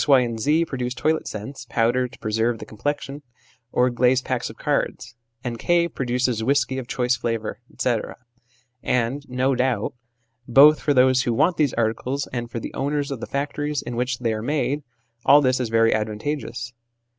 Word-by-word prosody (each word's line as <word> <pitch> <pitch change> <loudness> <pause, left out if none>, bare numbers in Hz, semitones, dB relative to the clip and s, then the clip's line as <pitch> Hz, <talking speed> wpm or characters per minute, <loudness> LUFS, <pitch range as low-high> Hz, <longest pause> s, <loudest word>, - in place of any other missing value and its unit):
Y. 135 -3 +6
and 115 -2 -2
Z. 155 +8 +2
produce 125 -4 -3
toilet 155 +5 0
scents, 115 +4 -7
powder 120 +2 +2
to - - -15
preserve 115 +2 0
the - - -8
complexion, 145 +5 -4 0.5
or 125 0 +2
glazed 125 +2 +2
packs 125 -2 -2
of 110 - -11
cards; 130 -4 -2 0.3
and 120 -2 -4
K. 170 +4 +2
produces 125 -5 -1
whisky 130 +1 +1
of 125 - -7
choice 125 -1 +1
flavour, 115 -2 -3
etc.; 120 -4 -1 0.7
and, 125 +4 0
no 130 +2 +1
doubt, 130 0 0 0.5
both 145 +5 +7
for 145 - +1
those 130 0 +5
who 120 -3 0
want 165 +6 +2
these 145 -5 +1
articles 120 +5 -1
and 120 -1 -3
for 115 - -4
the - - -7
owners 145 +1 -1
of 135 - -4
the - - -6
factories 145 +1 -2
in 120 0 -5
which 125 +1 -1
they 115 -2 -1
are 110 - -3
made, 145 +3 -1 0.4
all 145 +2 +7
this 130 -2 +2
is 125 -3 -1
very 115 0 +4
advantageous. 120 +3 -3
125 Hz, 180 wpm, -23 LUFS, 120-140 Hz, 0.7 s, both